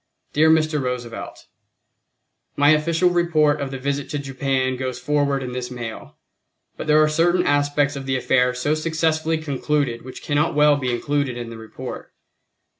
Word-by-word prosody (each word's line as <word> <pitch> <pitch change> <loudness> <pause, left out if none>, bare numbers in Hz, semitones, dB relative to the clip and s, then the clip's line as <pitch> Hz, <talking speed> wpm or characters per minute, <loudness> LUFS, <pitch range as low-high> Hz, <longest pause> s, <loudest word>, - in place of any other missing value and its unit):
Dear 155 +2 +4
Mr. 155 -2 +2
Roosevelt: 125 -2 -5 1.1
My 145 +1 +5
official 165 +3 +2
report 155 -4 +2
of 140 - -3
the 135 - -5
visit 140 +1 -3
to 145 - -2
Japan 135 -1 -1
goes 130 -1 -4
forward 140 0 0
in 125 - -5
this 125 0 -4
mail, 120 -3 -8 0.6
but - - -7
there 155 0 +5
are - - +4
certain 175 +4 +2
aspects 145 0 +1
of 135 -1 -6
the 135 - 0
affair 125 0 +2
so 135 +4 0
successfully 160 0 0
concluded 145 -4 -1
which 130 0 -10
cannot 145 +2 0
well 150 0 +5
be 130 -3 -2
included 140 +1 -1
in 120 -1 -6
the 115 - -8
report. 110 0 -8
145 Hz, 165 wpm, -22 LUFS, 130-155 Hz, 1.1 s, My